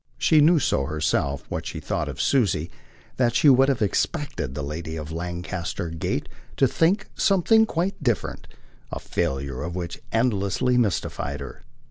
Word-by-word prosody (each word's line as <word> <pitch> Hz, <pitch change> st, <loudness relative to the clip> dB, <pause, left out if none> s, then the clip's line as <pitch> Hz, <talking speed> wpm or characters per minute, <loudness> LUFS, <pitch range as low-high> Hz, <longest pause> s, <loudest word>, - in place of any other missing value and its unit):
She 155 Hz, -2 st, +4 dB
knew 165 Hz, +3 st, +6 dB
so 70 Hz, -, +1 dB
herself 75 Hz, -2 st, -1 dB
what -, -, -4 dB
she -, -, -5 dB
thought -, -, -2 dB
of -, -, -7 dB
Susie 95 Hz, -, +1 dB, 0.5 s
that 120 Hz, -2 st, +2 dB
she 150 Hz, -, +6 dB
would 135 Hz, +1 st, +6 dB
have 130 Hz, -4 st, +1 dB
expected 70 Hz, -8 st, -1 dB
the 75 Hz, -, -3 dB
lady 80 Hz, +2 st, -5 dB
of 80 Hz, -1 st, -6 dB
Lancaster 85 Hz, 0 st, -4 dB
Gate 80 Hz, -1 st, -2 dB, 0.3 s
to 135 Hz, -, +5 dB
think 180 Hz, -, +2 dB
something 220 Hz, +4 st, +4 dB
quite 180 Hz, +2 st, -2 dB
different; 120 Hz, -6 st, -1 dB, 0.4 s
the -, -, -3 dB
failure 65 Hz, 0 st, -2 dB
of 85 Hz, +3 st, -4 dB
which 85 Hz, -2 st, -5 dB
endlessly 115 Hz, +1 st, +1 dB
mystified 95 Hz, -, -1 dB
her. 70 Hz, -, -9 dB
95 Hz, 155 wpm, -24 LUFS, -, 0.5 s, knew